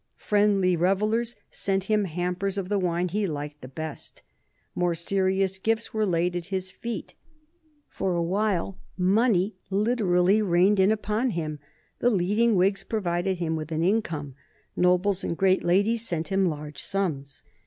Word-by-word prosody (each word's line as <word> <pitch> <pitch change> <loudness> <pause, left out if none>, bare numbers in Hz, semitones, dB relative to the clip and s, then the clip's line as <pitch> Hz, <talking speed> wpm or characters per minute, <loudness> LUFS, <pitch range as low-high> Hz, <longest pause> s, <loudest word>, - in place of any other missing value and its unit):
Friendly 205 -3 +2
revellers 215 +7 +1 0.2
sent 195 -1 -1
him 210 +1 +1
hampers 180 +3 -2
of 190 -2 -3
the 205 -1 +1
wine 180 0 0
he 205 +2 0
liked 150 -2 -5
the 130 - -8
best. 155 +3 -8 0.5
More 175 -1 0
serious 190 +2 0
gifts 225 +3 -1
were 215 -1 +1
laid 175 0 +1
at 175 -1 -4
his 190 -1 -3
feet. 235 +1 -6 0.7
For 185 -2 -2
a 170 - +1
while 195 0 -1 0.2
money 195 0 +2
literally 200 -2 +2
rained 190 +1 +3
in 190 +2 +5
upon 220 +3 0
him. 155 -7 -3 0.4
The 245 - +3
leading 210 +3 +2
Whigs 195 +2 +2
provided 185 -3 -1
him 165 -2 -1
with 155 0 -5
an 160 +1 0
income. 170 -8 0 0.4
Nobles 180 +2 +2
and 170 - -2
great 190 -1 +3
ladies 215 +6 +2
sent 165 -2 -3
him 195 -1 +2
large 150 -2 -5
sums. 150 -9 -3
190 Hz, 155 wpm, -26 LUFS, 175-205 Hz, 0.7 s, in